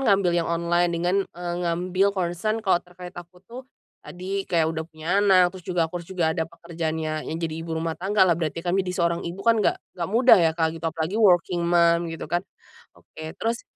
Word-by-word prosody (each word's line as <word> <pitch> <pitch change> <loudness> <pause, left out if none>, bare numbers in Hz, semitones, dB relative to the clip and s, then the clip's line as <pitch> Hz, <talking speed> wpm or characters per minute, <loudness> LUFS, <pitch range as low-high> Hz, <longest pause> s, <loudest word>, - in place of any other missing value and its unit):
ngambil 195 -3 +3
yang 170 -1 0
online 170 +1 +1
dengan, 175 +3 0 0.2
eee, 175 0 -4
ngambil 180 +3 +1
concern 185 +4 -1
kalau 185 -3 +3
terkait 180 0 -12
aku 175 +1 -12
tuh, 245 +5 -9 0.4
tadi 190 +2 -5
kayak 165 -3 +1
udah 160 0 -4
punya 160 -1 -10
anak, 185 -3 +5
terus 185 -2 -12
juga 175 -3 +1
ku 175 - -4
harus 170 - -13
juga 175 -4 0
ada 160 -1 -2
pekerjaannya, 160 -2 -4
yang 160 - -3
jadi 165 -1 -3
ibu 165 0 -4
rumah 160 -1 -3
tangga 195 +2 +2
lah 170 -3 +2
berarti 165 0 -3
jadi 185 +1 0
seorang 170 -1 0
ibu 180 +3 -6
kan 230 0 +4
nggak 210 - +2 0.2
nggak - - -2
mudah 235 +2 +6
ya 165 -2 +4
Kak, 160 -1 +1
gitu. 165 - -12
Apalagi 165 +4 -2
working 180 -4 +3
mom 170 0 +3
gitu 165 0 -6
kan. 175 +1 +1 0.6
Oke, 155 0 -10
terus, 230 +1 -2
175 Hz, 205 wpm, -24 LUFS, 165-185 Hz, 0.6 s, mudah